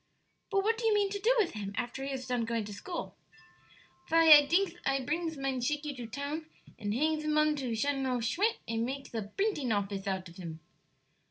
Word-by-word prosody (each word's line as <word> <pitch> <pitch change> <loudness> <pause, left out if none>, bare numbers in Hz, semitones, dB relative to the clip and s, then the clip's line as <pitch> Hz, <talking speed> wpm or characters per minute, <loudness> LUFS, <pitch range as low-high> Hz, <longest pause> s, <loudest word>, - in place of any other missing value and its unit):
But 390 -1 +2
what 450 +2 +1
do 460 - +1
you 435 - +4
mean 405 -1 +2
to 405 - -3
do 450 +5 +3
with 420 -6 +2
him 200 -2 -5
after 245 +3 -3
he 275 - -3
is 260 -1 -4
done 250 -2 0
going 230 -1 -1
to 205 - -7
school?" 340 - -6 0.9
"Vy, 330 0 +6
I 295 -1 +8
dinks 365 +3 +3
I 270 0 +1
prings 320 +2 -2
mine 270 -2 -1
Shakey 295 +3 -1
to 245 -3 -7
town 285 +6 -4 0.3
and 205 -1 -2
hangs 305 +6 +1
him 305 0 +1
on 305 0 +4
to 250 -5 -2
Sheneral 265 0 0
Shmicdt 400 - +1
and 230 0 -1
makes 270 +2 -5
a 225 - -1 0.2
brinting 390 - 0
office 200 -1 -1
out 190 -1 -2
of 170 - -14
him." 165 -3 -7
275 Hz, 210 wpm, -31 LUFS, 230-320 Hz, 0.9 s, I